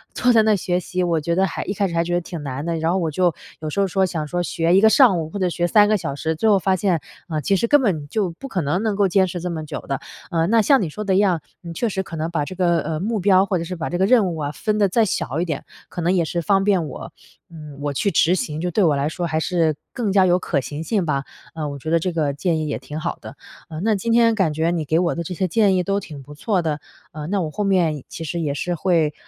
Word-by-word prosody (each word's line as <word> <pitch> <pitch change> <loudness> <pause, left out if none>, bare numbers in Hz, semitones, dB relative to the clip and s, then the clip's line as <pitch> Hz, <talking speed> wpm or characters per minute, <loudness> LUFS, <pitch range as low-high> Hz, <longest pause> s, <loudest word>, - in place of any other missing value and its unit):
坐 250 -1 +3
在 225 - +6
那 215 0 +3
儿 - - +3
学 180 -1 -1
习， 180 0 -2
我 170 -3 +1
觉 170 +2 -1
得 190 +1 +3
还 170 - -4
一 200 - -2
开 200 -1 0
始 170 - -6
还 170 0 +2
觉 175 +1 -1
得 175 - +1
挺 170 -2 -7
难 140 +1 -5
的， 170 0 -1
然 160 +1 0
后 185 - +1
我 165 -4 -1
就 175 +1 +2 0.3
有 155 -1 -4
时 175 - -3
候 195 - +4
说， 190 +2 +1
想 160 -4 -3
说 175 +4 -1
学 170 0 +1
一 195 - +5
个 220 - +7
上 220 -8 +5
午 155 - -4
或 200 - -6
者 185 -2 +1
学 175 0 0
3 205 +3 +5
个 215 0 +3
小 140 -6 -4
时， 160 +3 -2
最 220 +7 +1
后 200 - +5
发 190 +1 +1
现， 185 -3 +1 0.3
嗯， 155 -2 -2
其 195 - +2
实 215 +5 +1
根 290 +3 +5
本 225 -6 +3 0.2
就 195 +2 -1
不 180 +11 -9
可 185 -9 -2
能 150 +6 0
能 215 -2 0
够 200 -1 +3
坚 190 +1 +3
持 180 0 -5
这 180 - -3
么 160 -2 -4
久 - - -6
的。 135 -2 -3 0.3
呃， 165 -1 +1
那 225 +1 +4
像 270 +3 +4
你 175 - -2
说 210 +8 -6
的 195 -2 +1
一 - - +4
样， 190 -5 +2 0.2
嗯， 170 - -8
你 - - -6
确 235 +7 -1
实 190 -1 -2
可 170 - -8
能 160 +1 -2
把 150 -4 -1
这 185 - -8
个， 175 -2 +2
呃， 155 0 -3
目 215 +2 -1
标 190 0 +4
或 185 -2 0
者 165 - -3
是 180 +2 -5
把 165 -2 -4
这 175 - -2
个 190 - +3
任 220 -2 +4
务 - - -6
啊 145 -1 -3
分 210 +7 -2
得 205 -2 +4
再 225 +5 +3
小 155 -6 -2
一 180 - 0
点， 155 -5 -4 0.2
可 175 - -5
能 175 +2 +2
也 175 -3 +2
是 170 +2 -2
方 195 +3 +2
便 190 -6 +2
我， - - -8 0.4
嗯， 150 -4 -11
我 145 0 -1
去 200 +8 0
执 175 +2 +3
行， 155 -3 -3
就 180 0 -2
对 210 - +1
我 155 -4 +3
来 140 +2 0
说 175 +1 -3
还 155 -1 -1
是 165 -3 +1 0.2
更 225 -6 -1
加 195 -2 +5
有 180 0 +3
可 145 -6 -1
行 145 +5 -6
性 205 -6 0
吧。 140 -3 -1 0.3
嗯， 155 -2 -4
我 140 - -6
觉 155 - -5
得 165 - +4
这 180 +2 -2
个 150 -4 0
建 160 +2 0
议 155 - -2
也 145 - -2
挺 145 +4 -8
好 - - -3
的。 - - -10 0.3
嗯， 155 0 -6
那 225 - +3
今 230 +4 -2
天 230 -1 +4
感 185 -7 +1
觉 160 +2 0
你 165 -3 -2
给 155 +3 +1
我 175 -2 +1
的 170 - -3
这 180 - -5
些 185 +1 -1
建 205 -1 +3
议 180 - +1
都 200 +2 0
挺 145 -7 -10
不 145 +2 -12
错 185 +4 0
的， 155 -2 -2 0.3
呃， 150 0 -7
那 195 +2 0
我 160 - -2
后 210 - -2
面 170 -8 +1
其 165 - -7
实 170 +2 -3
也 150 -4 -1
是 175 +5 -2
会， 165 -4 +1
175 Hz, 335 characters per minute, -21 LUFS, 155-195 Hz, 0.4 s, 个